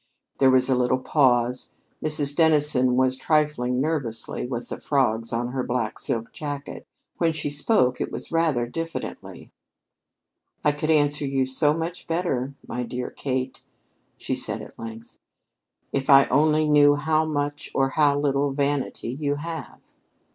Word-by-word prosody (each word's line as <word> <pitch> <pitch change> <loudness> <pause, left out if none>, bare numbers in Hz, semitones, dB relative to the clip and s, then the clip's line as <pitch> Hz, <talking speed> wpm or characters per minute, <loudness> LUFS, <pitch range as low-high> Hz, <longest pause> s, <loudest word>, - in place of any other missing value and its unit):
There 135 - +6
was 130 -1 +4
a 135 - +3
little 125 +1 +2
pause. 125 -2 +1 0.3
Mrs. 150 -2 -1
Dennison 150 -6 +3
was 130 0 +2
trifling 130 -3 +1
nervously 135 -6 -2
with 120 -1 -5
the - - -6
frogs 115 -5 0
on 120 +1 -1
her 130 +1 -2
black 120 -3 -2
silk 115 0 -3
jacket. 145 -2 -6 0.3
When 165 -2 +2
she 150 -2 -3
spoke, 145 - +1
it - - -2
was - - -6
rather 160 -7 +2
diffidently. 165 +7 -6 1.1
"I 150 - +4
could 150 +2 -3
answer 150 -1 +2
you 135 -1 +1
so 145 +3 +1
much 165 +2 -5
better, 140 -6 -1
my 125 - -3
dear 125 +1 -4
Kate," 130 -1 -3 0.6
she - - -3
said - - -3
at - - -14
length, 115 0 -9 0.7
"if 135 -1 -2
I 135 0 +8
only 155 +3 +3
knew 145 -1 +6
how 155 +1 +1
much 145 -1 -3
or 135 0 +2
how 145 0 +3
little 140 0 +1
vanity 140 -3 -1
you 145 +3 -1
have." 160 +1 -7
140 Hz, 150 wpm, -24 LUFS, 125-150 Hz, 1.1 s, I